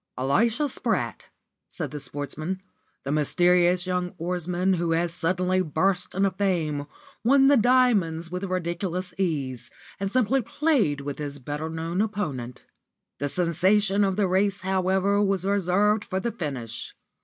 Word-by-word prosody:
"Elisha 225 - +2
Spratt," 270 - -2 0.4
said 155 -7 -5
the 150 - -5
Sportsman, 145 +6 -4 0.4
"the 140 - -3
mysterious 175 +4 +3
young 180 -1 -2
oarsman 180 +2 -1
who 170 -2 0
has 170 0 0
suddenly 185 +2 +1
burst 180 +3 0
into 195 0 +2
fame, 170 -7 -1 0.4
won 270 +3 +5
the 285 - +6
'Diamonds' 210 -10 +2
with 180 +1 -4
ridiculous 180 0 -3
ease, 140 -9 -2 0.3
and 195 0 -1
simply 255 +2 +2
played 230 - +1
with 140 0 -5
his 145 -1 -5
better 145 +4 -5
known 165 +3 -2
opponent. 150 - -3 0.6
The 145 - -1
sensation 190 +5 +3
of 195 -1 +1
the 200 -1 +1
race, 195 +2 +1
however, 190 +2 +1
was 195 -2 +1
reserved 200 +2 +2
for 190 -4 -2
the 235 +4 -2
finish. 140 - -6
180 Hz, 140 wpm, -25 LUFS, 160-200 Hz, 0.6 s, the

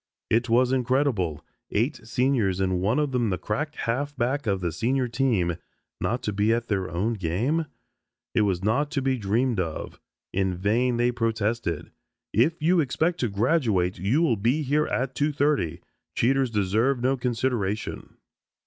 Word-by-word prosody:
It 120 +2 +2
was 125 +2 +4
incredible. 125 - 0 0.2
Eight 120 +8 0
seniors 120 -6 +1
and 95 -1 0
one 105 +7 +1
of 150 -2 +1
them 120 -4 +1
the 90 - 0
crack 150 - -3
halfback 135 +1 -1
of 100 -2 +1
the 85 -2 -2
senior 125 - 0
team, 115 -9 +1 0.4
not 120 +2 -1
to 105 - -2
be 105 +3 +2
at 115 0 0
their 95 -3 -1
own 100 +7 -1
game. 115 - -1 0.7
It - - +3
was 95 -3 0
not 130 +8 +1
to 140 - 0
be 130 -1 +1
dreamed 115 +3 +1
of. 80 -3 -4 0.3
In 95 -1 0
vain 115 +7 +1
they 120 +1 +2
protested. 115 -7 -1 0.4
"If 150 - +2
you 175 +2 +4
expect 160 +4 0
to 120 - 0
graduate, 100 - +1
you 115 - +2
will 125 -9 +2
be 125 +10 +1
here 150 +3 +1
at 130 +1 -1
2.30. 145 - 0 0.3
Cheaters 135 +2 +2
deserve 110 +5 +1
no 130 +3 +2
consideration." 120 -4 -2
120 Hz, 160 wpm, -26 LUFS, 100-135 Hz, 0.7 s, was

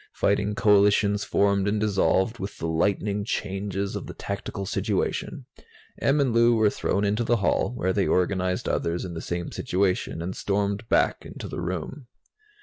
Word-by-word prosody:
Fighting 105 0 +1
coalitions 105 0 +4
formed 100 -1 +2
and 105 +1 +1
dissolved 105 +1 +1
with 95 +1 -6
the - - -5
lightning 100 +5 0
changes 100 -2 -3
of - - -5
the - - -8
tactical 100 0 -5
situation. - - -2 0.6
Em 140 +2 +3
and 135 -4 +2
Lou 115 0 +5
were 110 -2 +3
thrown 100 - -1
into 105 +4 +1
the 120 +1 +2
hall, 100 - +1
where 95 -4 0
they 100 - +1
organized 90 0 0
others 85 +2 -1
in 90 - -6
the 80 - -5
same 85 0 -4
situation, 90 -2 -1
and 90 +3 -4
stormed 100 +2 -1
back - - +2
into - - -8
the - - -5
room. 95 - -5
100 Hz, 165 wpm, -25 LUFS, 95-105 Hz, 0.6 s, Lou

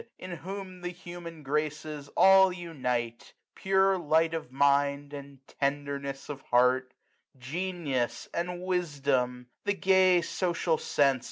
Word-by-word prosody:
In 180 -2 -7
whom 185 +2 -7
the 175 - -3
human 175 -2 -9
graces 150 0 -3
all 190 0 +7
unite: 125 -10 -4 0.2
Pure 190 0 +2
light 160 0 +2
of 160 -6 -5
mind, 140 +1 +2
and 140 -1 -10
tenderness 140 -1 -2
of 140 -2 -6
heart 125 +1 +2 0.5
j 135 +8 -5
Genius, 130 -9 -2
and 175 +1 -3
wisdom; 140 -9 -1 0.2
the 205 0 0
gay 185 -2 +4
social 170 -3 0
sense. 140 -3 +2
150 Hz, 120 wpm, -29 LUFS, 140-180 Hz, 0.5 s, all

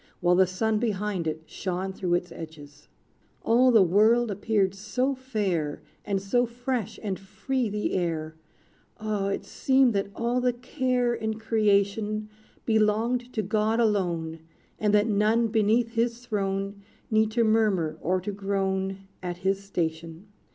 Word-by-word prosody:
While 175 -1 +3
the 185 +1 +5
sun 215 +4 0
behind 205 -6 -1
it, 155 0 -3
shone 185 +3 -4
Through 180 -2 0
its 175 0 -2
edges. 150 -3 -11 0.6
All 245 +3 +4
the 225 -5 +6
world 215 +6 +4
appeared 200 -1 +1
so 215 +7 -1
fair, 200 - -2 0.2
And 200 -2 -1
so 240 +6 +1
fresh 240 -2 -3
and 195 -4 -2
free 245 +5 -2
the 210 +1 -2
air, 165 -3 -1 0.7
Oh! 210 -2 -1
it 195 - -2
seemed 265 -2 +3
that 200 0 -1
all 240 +2 0
the 250 0 +2
care 250 -1 0
In 220 -1 -2
creation 215 -1 +1 0.4
Belonged 225 +3 +1
to 215 - -1
God 215 +3 +1
alone; 175 -7 0 0.4
And 210 -1 +2
that 205 0 +4
none 220 +2 +2
beneath 225 +2 +2
his 235 +1 -1
throne, 195 -2 -2 0.3
Need 220 0 +3
to 235 0 +3
murmur 200 -8 +2
or 185 +2 +1
to 205 - -3
groan 195 -1 -2
At 175 -1 -4
his 195 +1 +1
station. 165 -1 -4
210 Hz, 145 wpm, -27 LUFS, 190-230 Hz, 0.7 s, the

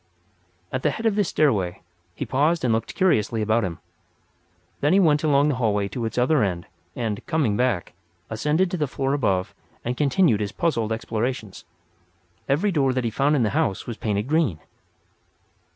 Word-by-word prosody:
At 130 - -2
the 150 - +2
head 220 +10 -5
of 225 - +3
the 205 - +3
stairway 105 - 0 0.3
he - - -4
paused 150 +4 +1
and 115 - +2
looked 115 - -2
curiously 115 - +2
about 110 +2 +2
him. 90 -3 -2
And - - -15 1.0
then 145 +4 +2
he 195 - +5
went 155 -5 +3
along 145 -1 +3
the 145 - 0
hallway 105 -4 +1
to 115 +4 -4
its 110 - -4
other 130 +4 +3
end; 90 -4 -1 0.3
and, 110 -4 -3
coming 145 -11 +1
back, 120 -6 0 0.3
ascended 150 +11 0
to 180 - -1
the 150 -3 0
floor 135 +1 -2
above 100 -10 0 0.3
and 120 +1 -1
continued 145 - +3
his 105 -2 -3
puzzled 115 -10 0
explorations. 110 -1 -3 0.8
Every 165 +9 +2
door 135 -6 +2
that 130 -1 -1
he 115 - -1
found 140 +6 +2
in 130 - +2
the 105 - +1
house 95 - 0
was 115 -2 -6
painted 105 0 -2
green. 150 - +1
125 Hz, 185 wpm, -24 LUFS, 110-150 Hz, 1.0 s, he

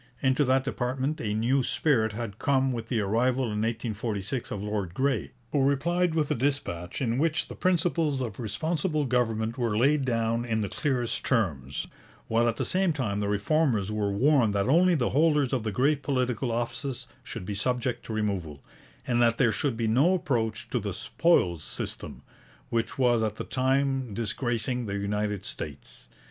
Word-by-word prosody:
Into 130 +2 +3
that 130 +1 +3
department 130 +5 -2
a 105 -1 -1
new 125 +5 +2
spirit 120 -5 +1
had 110 -2 -5
come 135 -1 +2
with 115 -2 -4
the 115 -2 0
arrival 120 +6 +1
in 105 -3 -2
1846 115 0 -2
of 100 - -4
Lord 105 -4 -3
Grey, 135 -1 0 0.2
who 145 - +2
replied 165 +5 +1
with 155 -3 +1
a - - +4
dispatch 115 -8 -2
in 120 +1 0
which 160 +1 +1
the - - -8
principles 165 -5 +1
of 115 -6 -4
Responsible 155 - -1
Government 115 -1 0
were 115 -3 0
laid 140 +4 +3
down 115 -2 0
in 110 -2 -1
the 100 - -2
clearest 125 0 -1
terms, 70 - -1 0.4
while 115 +1 +2
at 115 - -2
the - - -2
same 185 -1 +1
time 110 -9 -2
the 100 - -1
Reformers 105 0 +1
were 105 -1 0
warned 120 -1 +3
that 100 +1 +1
only 175 +5 +5
the 125 -6 0
holders 150 -2 +3
of 130 - +1
the 110 -1 -2
great 140 +7 +2
political 130 -3 0
offices 120 +3 -3 0.2
should - - -7
be 105 - -3
subject 120 +3 -1
to - - -5
removal, 95 -9 -2 0.4
and 120 -1 +1
that 115 -1 +3
there 120 -4 +4
should 130 0 -1
be 115 - 0
no 140 +12 +4
approach 115 -10 -1
to 125 - +1
the 100 -3 -4
'spoils 90 - +2
system,' - - -6 0.5
which 115 -1 -1
was 120 -3 +3
at 110 -1 -1
the - - -5
time 130 -3 0
disgracing 120 +2 -2
the 100 - -3
United 105 0 -2
States. 70 -2 -8
120 Hz, 180 wpm, -27 LUFS, 105-135 Hz, 0.5 s, only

